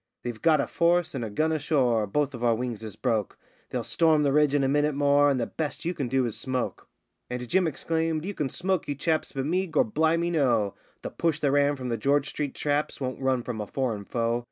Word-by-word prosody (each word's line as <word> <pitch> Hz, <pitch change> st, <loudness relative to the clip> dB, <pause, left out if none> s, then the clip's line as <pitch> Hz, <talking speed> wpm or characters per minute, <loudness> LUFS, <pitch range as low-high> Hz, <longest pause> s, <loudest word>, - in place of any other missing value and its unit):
They've 120 Hz, -3 st, -5 dB
got 160 Hz, -2 st, +4 dB
a -, -, +1 dB
force 175 Hz, 0 st, +1 dB
and 130 Hz, -4 st, -3 dB
a 110 Hz, -, -3 dB
gun 155 Hz, +10 st, 0 dB
ashore, 130 Hz, -8 st, +1 dB
both 145 Hz, +7 st, 0 dB
of 120 Hz, -1 st, -6 dB
our 115 Hz, -1 st, +3 dB
wings 120 Hz, -2 st, -4 dB
is 110 Hz, -2 st, -7 dB
broke; 110 Hz, -6 st, -1 dB, 0.3 s
They'll -, -, -2 dB
storm 160 Hz, -3 st, +3 dB
the 140 Hz, -, +2 dB
ridge 150 Hz, -1 st, +3 dB
in 140 Hz, -, +2 dB
a -, -, +2 dB
minute 145 Hz, +1 st, +1 dB
more, 145 Hz, 0 st, +4 dB
and 135 Hz, -2 st, +1 dB
the 115 Hz, -, 0 dB
best 155 Hz, +4 st, -4 dB
you 175 Hz, -, 0 dB
can 140 Hz, -7 st, -3 dB
do 130 Hz, +1 st, +1 dB
is 115 Hz, -, -3 dB
smoke.' 130 Hz, -1 st, -3 dB, 0.4 s
And 125 Hz, 0 st, -4 dB
Jim 180 Hz, +5 st, +2 dB
exclaimed: 160 Hz, +1 st, -1 dB
'You 205 Hz, -, -3 dB
can 145 Hz, -7 st, -2 dB
smoke, 185 Hz, +3 st, -1 dB
you 145 Hz, -, -2 dB
chaps, 155 Hz, +3 st, -1 dB
but 135 Hz, -1 st, -3 dB
me 185 Hz, +5 st, 0 dB
Gor' 160 Hz, -, +3 dB
bli' 160 Hz, +8 st, +1 dB
me, 170 Hz, +1 st, 0 dB
no! 120 Hz, -, +2 dB, 0.3 s
The -, -, -5 dB
push 165 Hz, -2 st, 0 dB
that 140 Hz, -, +2 dB
ran 145 Hz, +1 st, +3 dB
from 130 Hz, -2 st, -5 dB
the 115 Hz, -, -1 dB
George 140 Hz, +5 st, +1 dB
street 145 Hz, -2 st, -4 dB
traps 145 Hz, 0 st, -1 dB
won't 130 Hz, -1 st, -4 dB
run 130 Hz, -2 st, +1 dB
from 115 Hz, -3 st, -4 dB
a 105 Hz, -, -5 dB
foreign 115 Hz, -6 st, -2 dB
foe. 115 Hz, +1 st, 0 dB
140 Hz, 245 wpm, -27 LUFS, 125-155 Hz, 0.4 s, got